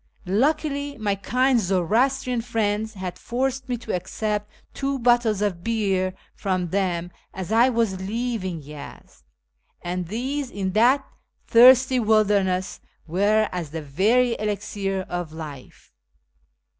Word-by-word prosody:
Luckily 285 - 0
my 210 -3 0
kind 250 +6 +2
Zoroastrian 230 +7 +1
friends 220 -2 -1
had 185 -2 -6
forced 260 +2 -2
me 245 - 0
to 230 -1 -5
accept 210 +3 -2 0.2
two 275 0 -2
bottles 240 -4 +2
of 180 -4 -2
beer 195 -5 0 0.2
from 185 -3 -2
them 175 -2 -1 0.2
as 190 +1 -5
I 235 +3 +5
was 225 -6 0
leaving 200 -5 -3
Yezd, 145 0 -11 0.6
and 175 0 -3
these, 260 - -3
in 195 -3 -3
that 245 +7 +4 0.4
thirsty 255 +2 +6
wilderness, 205 -4 +2 0.3
were 205 +6 +2
as 175 -4 -4
the 160 +1 -6
very 225 - +2
elixir 200 -2 -2
of 175 -3 -4
life. 150 -5 -10
210 Hz, 120 wpm, -24 LUFS, 185-245 Hz, 0.6 s, thirsty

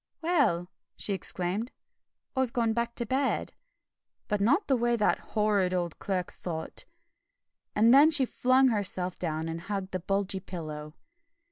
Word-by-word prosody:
"Well!" 260 - +2 0.3
she 205 - -1
exclaimed, 190 +5 -2 0.6
"I've 260 -2 0
gone 230 -3 +1
back 235 +1 -2
to 235 - -1
bed, 265 +3 0 0.7
but 210 -2 0
not 285 - +3
the 270 - +2
way 240 0 +2
that 210 -3 +2 0.2
horrid 200 -4 +2
old 175 -3 -2
Clerk 185 -3 -2
thought." 160 -3 -5 0.9
And 225 +3 +5
then 290 +3 +8
she 295 -4 +5
flung 255 +2 +3
herself 185 -4 -1
down 160 -2 -2
and 165 0 -4
hugged 195 0 -4
the 185 - -2
bulgy 195 +1 -1
pillow. 155 -4 -7
205 Hz, 145 wpm, -29 LUFS, 180-240 Hz, 0.9 s, then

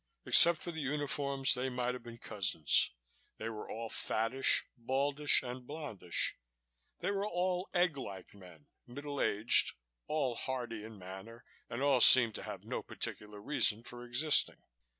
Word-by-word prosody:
Except 170 -1 +7
for 175 - -6
the 160 -1 -6
uniforms, 140 -1 0
they 130 +1 -2
might 125 -1 -2
have 125 - -8
been 115 0 -11
cousins 85 - +1 0.4
they 110 - -5
were 110 -2 -8
all 115 +1 -5
fattish, 115 +4 +1
baldish 140 +4 +1
and 125 0 -8
blondish. 140 - -2 0.6
They 185 - -1
were 200 +1 -2
all 180 0 -2
egg 175 -5 +1
like 95 -8 -8
men, 90 -7 -16 0.2
middle 140 +3 -6
aged, 105 +3 +3 0.3
all 145 -5 -1
hearty 120 -3 -5
in 110 -1 -11
manner 95 +5 -11 0.2
and 120 +4 -4
all 140 -3 +3
seemed 115 -2 +8
to - - -7
have - - -8
no - - -5
particular 105 0 -6
reason 110 -1 0
for 120 0 -9
existing. 130 +5 +2
125 Hz, 150 wpm, -33 LUFS, 110-145 Hz, 0.6 s, seemed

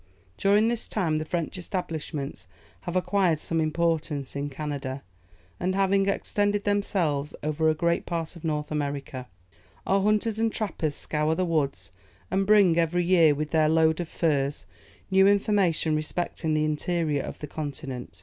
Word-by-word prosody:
During 205 - +3
this 235 -1 -2
time, 165 -7 0
the 155 - -3
French 170 +2 -3
establishments 155 - -4 0.4
have 175 - -3
acquired 185 -2 +2
some 165 +2 -1
importance 155 -3 -1
in 140 +1 -2
Canada, 140 -2 -5 0.6
and 185 +1 0
have 195 0 +2
extended 205 +1 +1
themselves 175 -8 0
over 155 +1 +1
a 155 - +2
great 170 +2 0
part 165 0 -3
of 170 - -12
North 150 -2 -2
America. 140 -3 -3 0.6
Our 195 0 +2
hunters 215 +2 +1
and 225 0 +2
trappers 165 -10 -2
scour 155 +1 -1
the 185 - 0
woods, 155 -5 -1 0.4
and 195 +1 +1
bring, 200 -6 +5
every 170 +2 +1
year, 170 -5 +5
with 150 +1 -3
their 155 -1 +3
load 160 0 +3
of 170 -2 -3
furs, 145 -4 0 0.5
new 190 +1 +6
information 200 -6 +2
respecting 155 0 -2
the 155 0 +2
interior 155 -1 0
of - - -7
the - - -6
continent. 140 - -6
160 Hz, 155 wpm, -26 LUFS, 150-190 Hz, 0.6 s, new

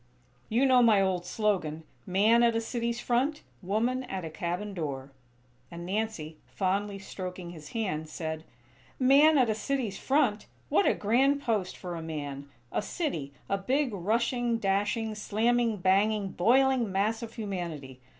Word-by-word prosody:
You 240 +5 +3
know 255 -2 +6
my 225 -4 +5
old 185 -2 0
slogan: 180 -8 -1 0.2
'Man 210 +5 +4
at 235 -1 +4
a - - +2
city's 235 +1 -2
front; 265 +6 0 0.2
woman 230 +7 0
at 190 -7 -5
a 160 - -6
cabin 180 +4 -3
door.'" 140 -6 -4 0.6
And 170 0 -8
Nancy, 190 -6 -3
fondly 200 +1 -1
stroking 185 -2 -7
his 155 -3 -11
hand, 170 -9 -2
said: 160 0 -4 0.5
"Man 285 +4 +6
at 255 -3 +4
a 220 - +2
city's 220 -2 -2
front! 265 -7 +1 0.2
What 390 - +3
a - - +3
grand 270 +7 +2
post 210 -6 -1
for 180 -2 -6
a 165 - -5
man! 145 -3 -6 0.2
A - - 0
city, 205 - -3 0.2
a 195 - 0
big, 260 +4 0
rushing, 235 +5 0
dashing, 210 +2 0
slamming, 225 +2 +1
banging, 195 +2 +2
boiling 250 +2 +3
mass 210 +4 0
of 230 -1 -7
humanity! 170 - -5
210 Hz, 150 wpm, -29 LUFS, 180-235 Hz, 0.6 s, know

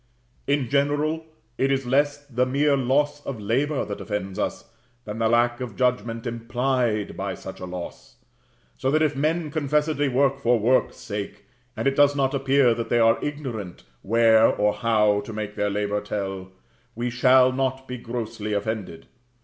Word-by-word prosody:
In 140 -2 +1
general 145 +4 0 0.3
it 135 +1 +2
is 135 -1 0
less 145 +3 +1
the 125 -2 0
mere 140 +2 +2
loss 145 +3 +1
of 130 -5 -5
labor 130 +8 0
that 100 - -6
offends 95 -2 -4
us, - - -3 0.4
than 105 +1 -6
the 115 -1 +2
lack 120 +1 +2
of 120 -5 -5
judgment 115 -3 -1
implied 120 -2 -1
by 95 -1 -3
such 95 - -9
loss; 90 +9 -8 0.6
so 130 - 0
that 155 +3 +3
if 150 -2 +1
men 155 +2 0
confessedly 150 -1 0
work 135 +1 +2
for 120 -2 +3
work's 120 +4 +2
sake, 100 -1 -6 0.3
and 110 - -3
it 135 - +2
does 145 0 +4
not 135 -1 +1
appear 135 -2 +3
that 115 0 -4
they 120 - +2
are 115 -1 +3
ignorant 125 -11 -5 0.2
where 115 +1 +5
or 105 0 +1
how 105 -3 +2
to 105 - -9
make 105 -1 -4
their 105 - 0
labor 105 0 -1
tell, 95 -2 -4 0.5
we 120 +1 -2
shall 130 +1 +5
not 130 0 -2
be 125 -1 -6
grossly 115 -3 -4
offended. 100 -4 -3
125 Hz, 165 wpm, -24 LUFS, 105-140 Hz, 0.6 s, where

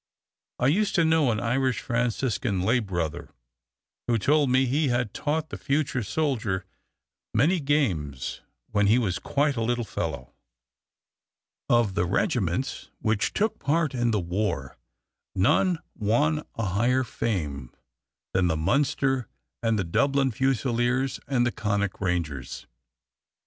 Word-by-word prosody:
I - - 0
used 195 +10 +2
to 170 - +4
know 160 -4 +3
an 110 -2 0
Irish 125 +4 0
Franciscan 115 -5 -1
lay 115 +6 +3
brother 85 -8 -3 0.8
who 120 -1 +2
told 145 +5 +3
me 130 +1 +4
he 145 +4 +1
had 120 -4 0
taught 155 +1 -1
the - - -7
future 140 -2 0
soldier 110 -7 -1 0.7
"many 160 - +3
games" 95 - -1 0.3
when 105 -1 +3
he 110 +4 +5
was 100 -7 0
quite 145 0 0
a 115 - -2
little 120 +1 0
fellow. 70 - -4 1.4
Of 120 -5 +3
the 95 -2 +1
regiments 100 - -1
which 110 -2 0
took 215 +1 0
part 155 +1 +1
in 120 -2 +1
the 110 -2 +1
war 90 +1 -2 0.6
none 175 - +3 0.2
won 145 +9 +1
a 115 - -2
higher 120 +7 +2
fame 75 - -3 0.6
than 95 -1 +3
the 80 -2 0
Munster 135 - +1 0.3
and 115 -1 +1
the 100 - 0
Dublin 135 +9 +2
Fusiliers 130 +1 0
and 125 -3 +2
the 120 - +1
Connaught 100 -4 -2
Rangers. 85 -8 -2
120 Hz, 135 wpm, -26 LUFS, 100-135 Hz, 1.4 s, he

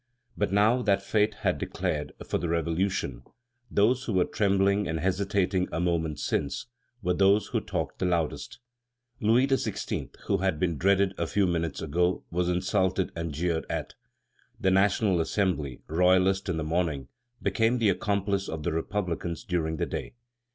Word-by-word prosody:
But 105 -2 0
now 105 +5 +4
that 100 -4 +2
fate 105 +1 +1
had - - +2
declared 75 -1 -2
for - - -1
the 85 - -2
Revolution, 85 -6 -1 0.5
those 120 +6 +2
who 110 - -2
were 90 -1 +3
trembling 100 0 +2
and 80 0 -2
hesitating 95 +1 +1
a - - -2
moment 85 -3 0
since, 70 - -1 0.4
were 90 0 +2
those 100 +3 +3
who - - 0
talked - - -4
the 90 - +1
loudest. 85 +7 -1 0.6
Louis 120 +2 +4
XVI., 135 -1 -2 0.2
who 100 - +2
had 95 -5 0
been 85 -5 0
dreaded 100 0 +3
a 85 - 0
few 100 +3 +2
minutes 85 -3 -1
ago, 90 +4 +1
was 90 +1 0
insulted 95 +1 +1
and 85 -1 -3
jeered 80 +2 -1
at. - - -3 0.7
The 95 - +2
National 95 -1 +3
Assembly, 80 - -1
royalist 95 +4 +3
in 85 - 0
the 80 - -1
morning, 80 -4 -1 0.3
became 115 +5 +1
the 115 -4 +3
accomplice 100 0 0
of 80 -1 -4
the 85 - 0
republicans 85 -1 -2
during 80 -3 -1
the - - 0
day. - - -5
90 Hz, 160 wpm, -28 LUFS, 85-100 Hz, 0.7 s, now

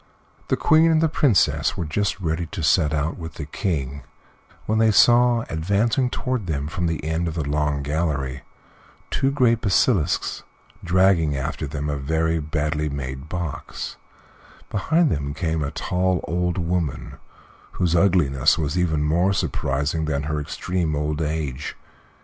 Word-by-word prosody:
The - - +1
Queen 160 +1 +4
and 160 -1 +4
the 160 - +3
Princess 145 - +2
were 85 - -2
just 100 +6 -1
ready 80 -1 -2
to 85 -1 -6
set 75 0 +3
out 80 +2 -1
with 80 -1 -7
the 75 - -5
King 70 -3 -3 0.6
when 110 +1 +1
they 110 0 +5
saw, 120 +2 +5
advancing 100 +10 +1
toward 125 -6 -3
them 70 -3 -2
from 85 +2 -2
the 80 -2 -3
end 80 +2 -1
of 80 - -4
the 80 -4 -2
long 75 -1 0
gallery, 70 -3 -2 0.7
two 135 - +1
great 125 -5 +2
basilisks, 95 - +1 0.4
dragging 90 -5 +3
after 75 +2 -3
them 75 +1 -4
a 75 -1 -1
very 80 +3 0
badly 75 0 -1
made 65 0 -6
box; 85 -5 -5 0.7
behind 160 - +2
them 70 0 -2
came 80 -2 -1
a 70 - -2
tall 90 +2 0
old 90 +1 -1
woman, 85 -4 -2 0.6
whose 85 -2 0
ugliness 85 -8 +3
was 75 0 -2
even 80 -4 +1
more 85 +6 +2
surprising 75 -2 -1
than 70 -2 -1
her 75 0 -2
extreme 80 +1 -2
old 75 +1 -2
age. 75 -3 -3
80 Hz, 150 wpm, -23 LUFS, 75-95 Hz, 0.7 s, they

